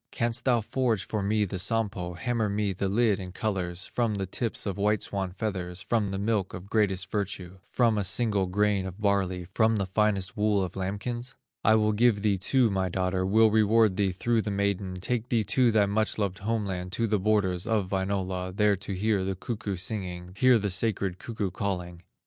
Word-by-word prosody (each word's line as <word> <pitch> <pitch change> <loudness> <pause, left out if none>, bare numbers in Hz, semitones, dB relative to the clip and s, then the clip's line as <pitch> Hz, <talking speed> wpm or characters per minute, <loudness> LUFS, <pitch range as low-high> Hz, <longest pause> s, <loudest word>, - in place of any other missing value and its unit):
Canst 115 -1 -1
thou 120 -3 +3
forge 115 -3 0
for 105 - -2
me 105 +2 +1
the 95 -1 -4
Sampo, 100 -4 0
Hammer 115 +3 -1
me 100 -1 0
the 95 +1 -2
lid 105 0 +2
in 90 -1 -7
colors, 90 -3 -2
From 115 -3 -1
the 100 -1 -2
tips 115 +5 -2
of 100 -1 -3
white 105 +1 +2
swan 95 -2 -3
feathers 90 -3 -4
From 105 0 0
the 95 - -3
milk 100 -1 -1
of 95 +3 -10
greatest 100 -3 +1
virtue, 95 -3 -4
From 115 +1 +1
a - - 0
single 100 -1 +1
grain 100 0 +1
of 95 +2 -9
barley, 95 -3 0
From 110 +1 +3
the 100 -2 0
finest 95 0 0
wool 105 -2 +2
of 90 - -5
lambkins? 105 +6 -4 0.3
"I 110 - +5
will 110 -1 +3
give 105 -2 +3
thee 100 -3 +2
too 120 +3 +3
my 95 -1 0
daughter, 95 +1 -1
Will 110 +2 +5
reward 110 -1 +4
thee 95 -1 +1
through 115 +5 0
the 105 - -4
maiden, 100 -2 -1
Take 120 +5 -2
thee 115 -3 +2
to 125 +2 +3
thy 105 -2 +4
much 105 +2 0
loved 100 -3 -2
home 110 +1 -1
land, 90 -2 -4
To 115 - +1
the 105 -2 +1
borders 95 -2 +1
of 105 -4 0
Wainola, 95 -1 -2
There 105 -1 +4
to 95 +1 -6
hear 100 +1 +1
the 95 0 -2
cuckoo 105 0 -4
singing, 90 -2 -4
Hear 130 +2 +5
the 100 -2 -1
sacred 95 -1 0
cuckoo 105 -5 -3
calling." 90 -3 -4
100 Hz, 200 wpm, -27 LUFS, 95-110 Hz, 0.3 s, I